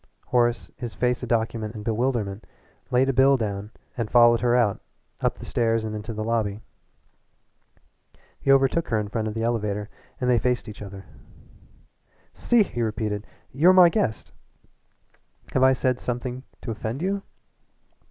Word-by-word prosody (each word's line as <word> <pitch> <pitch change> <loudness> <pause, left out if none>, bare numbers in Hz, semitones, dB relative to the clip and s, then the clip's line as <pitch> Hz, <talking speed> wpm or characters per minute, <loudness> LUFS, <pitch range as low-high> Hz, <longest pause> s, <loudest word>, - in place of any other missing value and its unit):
Horace, 120 -1 +1
his 120 -2 -6
face 125 0 0
a 125 - -5
document 115 -1 -1
in 105 - -7
bewilderment, 110 -3 -1 0.4
laid 125 +2 +3
a - - +2
bill 135 +1 +5
down 105 -3 -3 0.3
and 115 -4 -3
followed 120 -1 +5
her 120 0 +3
out, 115 -5 +2 0.4
up - - 0
the - - -9
stairs 115 -1 0
and 110 0 -4
into 105 +2 -5
the 110 -1 -4
lobby. 110 -3 -1 1.8
He 135 - +2
overtook 135 +4 +3
her 110 - 0
in 105 -1 -4
front 110 0 -2
of 110 - -4
the 115 - -2
elevator 105 -3 -2 0.3
and 125 - -1
they 125 -2 +4
faced 125 +2 0
each 105 0 -9
other. 100 -1 -9 1.3
"See 240 -3 +3
here," - - -12
he 120 - -2
repeated 105 -1 -2 0.2
"You're 165 +8 +5
my 180 -2 +8
guest. 165 - -2 1.2
Have 130 - +2
I 130 0 +6
said 125 -1 0
something 125 +1 -4 0.2
to 120 - -4
offend 115 +7 -4
you?" 195 +1 -1
115 Hz, 160 wpm, -25 LUFS, 110-125 Hz, 1.8 s, my